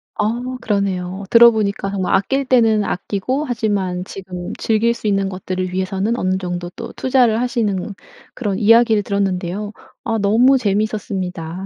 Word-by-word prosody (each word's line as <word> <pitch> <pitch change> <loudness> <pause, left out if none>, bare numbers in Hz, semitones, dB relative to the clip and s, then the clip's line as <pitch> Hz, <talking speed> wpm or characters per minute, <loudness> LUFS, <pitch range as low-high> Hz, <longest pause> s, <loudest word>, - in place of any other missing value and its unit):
아 210 0 +1 0.3
그러네요. 195 -2 -2
들어 235 0 +8
보니까 200 -3 -2
정말 190 -2 -1
아낄 270 +8 +1
때는 225 -4 +3
아끼고 215 +11 -2
하지만 205 -7 -1
지금 180 -2 -7
즐길 225 +1 +1
수 230 - -12
있는 195 -1 +1
것들을 185 -1 -4
위해서는 195 +4 -1
어느 185 -2 0
정도 175 -1 -4
또 230 - -8
투자를 250 -4 +2
하시는 220 -6 -1 0.4
그런 205 -6 -2
이야기를 225 0 +4
들었는데요. 200 +1 -2 0.3
아 225 -1 -1
너무 230 +7 +4
재미있었습니다. 195 -5 -2
200 Hz, 350 characters per minute, -19 LUFS, 185-225 Hz, 0.4 s, 들어